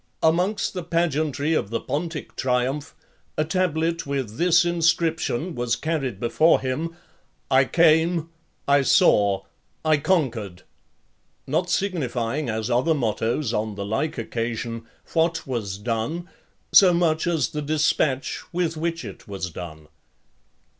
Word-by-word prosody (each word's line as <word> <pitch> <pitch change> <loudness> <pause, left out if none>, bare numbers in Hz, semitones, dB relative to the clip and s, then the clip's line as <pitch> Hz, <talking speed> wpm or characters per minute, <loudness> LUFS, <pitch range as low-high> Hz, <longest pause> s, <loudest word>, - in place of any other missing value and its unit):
Amongst 180 +6 +2
the 180 - -3
pageantry 160 -3 0
of 100 - 0
the 115 - -1
Pontic 160 +1 -4
triumph, 130 +4 -1 0.4
a 155 - +2
tablet 165 -2 0
with 130 -6 -3
this 175 0 +4
inscription 165 -2 +1
was 120 -3 0
carried 140 -10 -2
before 140 +8 +3
him: 155 +6 -3 0.6
I 130 0 +5
CAME, 165 +3 +3 0.4
I 140 0 +5
SAW, 100 -6 +4 0.4
I 155 -1 +4
CONQUERED; 125 - -1 0.8
not 170 +6 0
signifying, 145 - -1
as 110 +2 -2
other 130 +7 +2
mottos 120 0 -1
on 105 -1 -2
the 100 0 -4
like 110 +10 -2
occasion, 115 0 -4 0.3
what 165 0 +1
was 110 -7 -3
done, 115 - -3 0.4
so 185 -3 +7
much 165 -1 +1
as 160 -8 +1
the 150 - -4
dispatch 150 -2 0
with 170 -2 -1
which 165 +1 -2
it - - -10
was 95 -3 -5
done. 80 -3 -9
150 Hz, 125 wpm, -24 LUFS, 115-165 Hz, 0.8 s, so